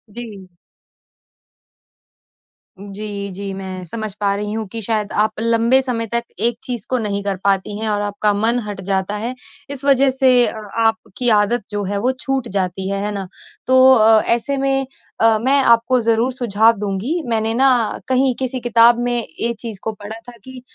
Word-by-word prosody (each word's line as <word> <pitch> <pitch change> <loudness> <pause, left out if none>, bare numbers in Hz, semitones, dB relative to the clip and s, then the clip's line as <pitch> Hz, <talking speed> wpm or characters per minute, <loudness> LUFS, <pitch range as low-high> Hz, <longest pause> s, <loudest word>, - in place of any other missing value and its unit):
जी। 210 -6 -8 2.3
जी, 200 0 -6
जी। 195 +1 -6
मैं 190 -1 -7
समझ 215 +3 -6
पा 200 -1 +1
रही 210 0 -4
हूँ 220 0 -3
कि 225 - -4
शायद 215 -1 -2
आप 215 0 +1
लंबे 230 +3 +3
समय 240 -3 -3
तक 235 +2 0 0.2
एक 235 0 +3
चीज़ 245 -3 -5
को 255 - +1
नहीं 200 -3 -3
कर 200 -1 -1
पाती 200 +1 0
हैं 220 - -3
और 205 -1 -1
आपका 205 0 0
मन 225 +4 +1
हट 200 -2 -6
जाता 195 +1 -1
है। 235 +4 -4 0.4
इस 280 -1 0
वज़ह 275 -1 +4
से 265 0 +2 0.2
अ, - - -3 0.3
आपकी 225 +2 +1
आदत 205 +3 +1
जो 205 0 -3
है 200 +1 -3
वो 255 +3 +1
छूट 270 -4 -2
जाती 190 0 -2
है, 200 0 -2
है 210 - -2
ना? 195 -2 -5 0.4
तो 260 0 +6
अ, 220 -2 +5
ऐसे 275 +4 -3
में 270 0 0 0.4
अ, 225 -1 +4
मैं 275 +2 +4
आपको 235 +1 +3
ज़रूर 230 +3 +1
सुझाव 230 -2 +2
दूँगी। 210 - -2
मैंने 225 0 0
ना 250 -3 +2
कहीं 260 0 +2
किसी 260 0 -2
किताब 235 0 +4
में 240 0 0 0.2
ये 235 0 0
चीज़ 220 -5 -7
को 220 - -2
पढ़ा 210 +2 -10
था 240 - -14
कि 260 -1 -11
225 Hz, 180 wpm, -18 LUFS, 205-245 Hz, 2.3 s, तो